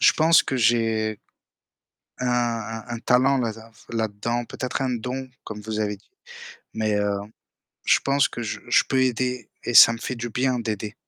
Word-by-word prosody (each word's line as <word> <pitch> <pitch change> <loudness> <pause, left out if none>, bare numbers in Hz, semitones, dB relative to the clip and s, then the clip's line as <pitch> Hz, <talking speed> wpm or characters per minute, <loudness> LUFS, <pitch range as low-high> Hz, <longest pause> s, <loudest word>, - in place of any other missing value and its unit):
je - - +6
pense 165 +1 +5
que 135 - -3
j'ai 110 -2 +1 1.0
un 125 - -2
un 115 -2 -1
un - - -7
talent 130 +3 +3
là 115 -3 -1
d 110 - -12 0.3
là-dedans, 115 +1 -2
peut-être 130 +1 -4
un 130 - 0
don 125 +2 -4 0.2
comme 105 -1 -7
vous 110 0 -4
avez 105 -1 -1
dit. 100 - -30 0.6
Mais 110 -1 0
heu, 100 -1 0 0.7
je - - +5
pense 140 +1 +2
que 120 - -7
je 105 - -4
je 120 - +5
peux 130 - +1
aider 125 -2 -1
et 120 - -3
ça 115 - +9
me - - -6
fait 130 - -4
du 120 +1 -5
bien 125 +1 0
d'aider. 105 -2 -4
115 Hz, 185 wpm, -24 LUFS, 110-125 Hz, 1.0 s, ça